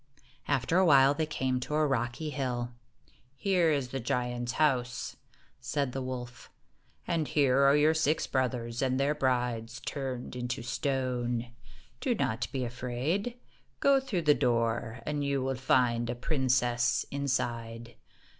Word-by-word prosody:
After 145 +5 +2
a - - +5
while, 135 -2 +6
they 155 +1 -1
came 130 -4 -1
to 150 +4 -3
a 155 0 +3
rocky 135 +2 -1
hill. 125 -4 -2 0.6
"Here 180 +2 +2
is 140 -4 0
the 135 - -3
giant's 120 0 -2
house," 125 -6 0 0.4
said 140 +1 -1
the 135 - -4
wolf, 125 -1 -6 0.6
"and 165 -3 0
here 135 -3 +3
are 140 - +5
your 155 +2 +4
six 160 -1 +1
brothers 125 -3 -1
and 130 -1 +1
their 140 +2 +2
brides 120 -4 -1
turned 130 -3 -4
into 125 -1 -3
stone. 125 -1 -1 0.5
Do 250 -4 0
not 115 - -1
be 130 -2 -2
afraid. 130 - -2 0.4
Go 280 -1 +5
through 230 -11 -2
the 150 -1 +6
door, 115 -2 0
and 150 -1 -1
you 140 -2 0
will 135 0 0
find 125 -2 +2
a 120 - -1
princess 125 -3 +1
inside. 120 -4 -2
130 Hz, 145 wpm, -30 LUFS, 120-145 Hz, 0.6 s, while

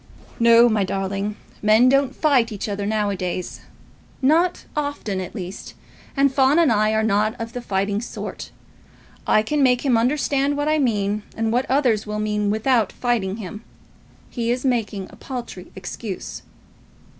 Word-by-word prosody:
"No, 235 0 +7
my 215 -3 +2
darling. 195 +2 -2 0.3
Men 215 +4 +5
don't 275 0 +2
fight 260 -7 +2
each 205 0 -4
other 200 -1 -3
now 210 -1 0
a - - -2
days; 180 -1 -4 0.6
not 330 +6 +2
often, 285 -10 -2
at 185 - -8
least, 185 -2 -7 0.4
and 275 -1 +3
Fawn 270 +2 +4
and 330 -6 +4
I 215 -1 +3
are 220 0 +1
not 215 +3 +1
of 230 0 -5
the 245 - -4
fighting 200 -1 -1
sort. 240 - -7 0.8
I 215 - +4
can 295 +6 0
make 250 0 +3
him 250 -4 +4
understand 275 +3 +1
what 290 +1 -1
I 310 0 +2
mean 210 -5 0 0.2
and 225 0 0
what 250 +3 0
others 250 -6 +2
will 210 0 -3
mean 210 -1 0
without 220 0 +2
fighting 225 -6 -1
him. 210 +1 -8 0.7
He 235 -2 -2
is 250 +2 -1
making 220 -6 -1
a - - -13
paltry 235 -6 -7
excuse." 190 +1 -6
225 Hz, 165 wpm, -22 LUFS, 205-260 Hz, 0.8 s, No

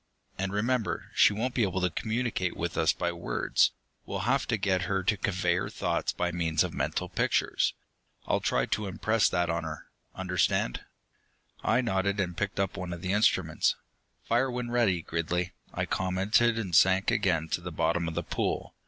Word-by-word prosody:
And 95 0 -2
remember, 115 +3 -1
she - - +6
won't 120 +5 -2
be 125 - 0
able 95 -3 +1
to 90 -1 +1
communicate 110 -2 -2
with 85 -1 -3
us 80 - +3
by 85 -1 -2
words 85 0 +1 0.3
we'll - - -4
have - - +1
to 115 - +1
get 95 -2 +1
her 95 -1 0
to 105 +3 +2
convey 95 -3 0
her 95 - -2
thoughts - - -1
by 90 0 -1
means 85 -2 +1
of - - -4
mental - - -2
pictures. - - +1 0.5
I'll - - +1
try - - +1
to 105 - -2
impress 110 +3 +2
that 85 -1 0
on 85 -1 -2
her. 80 -1 -6 0.3
Understand?" 90 -9 0 0.8
I - - +3
nodded, 100 -3 0
and 90 -3 -1
picked 100 0 -2
up 95 -1 -1
one 90 -1 -4
of 85 +1 -8
the 95 +1 0
instruments. 95 -6 +2 0.5
"Fire 120 +3 +1
when 125 -1 -3
ready, 105 -9 +2
Gridley," 85 +3 -2 0.2
I - - -2
commented, 100 +5 +2
and 95 -7 -2
sank 95 +2 +5
again 80 -4 +1
to 85 - -1
the 90 +1 -6
bottom 85 +1 0
of 80 - -4
the - - -1
pool. - - -2
95 Hz, 185 wpm, -29 LUFS, 85-105 Hz, 0.8 s, she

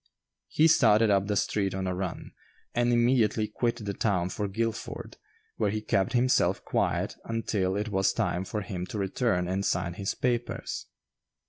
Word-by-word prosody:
He 155 - +4
started 110 -8 +5
up 100 0 +2
the 105 - 0
street 100 -1 0
on 95 0 -2
a 90 - -1
run, 90 -2 -4 0.4
and 120 0 +2
immediately 120 -3 +3
quit 115 +1 -2
the 100 - -2
town 95 -4 0
for 105 +2 -2
Guilford, 110 +3 -4 0.4
where 105 - +1
he 110 +2 -1
kept 95 -3 0
himself 125 +1 +2
quiet - - 0
until 105 -4 -1
it 105 +2 -2
was 95 -1 +2
time 95 -4 -1
for 105 +2 -4
him 95 -3 -5
to - - -5
return 95 -2 0
and 95 +2 -1
sign 90 -2 0
his 95 +2 -3
papers. 120 -1 -2
105 Hz, 165 wpm, -28 LUFS, 95-115 Hz, 0.4 s, started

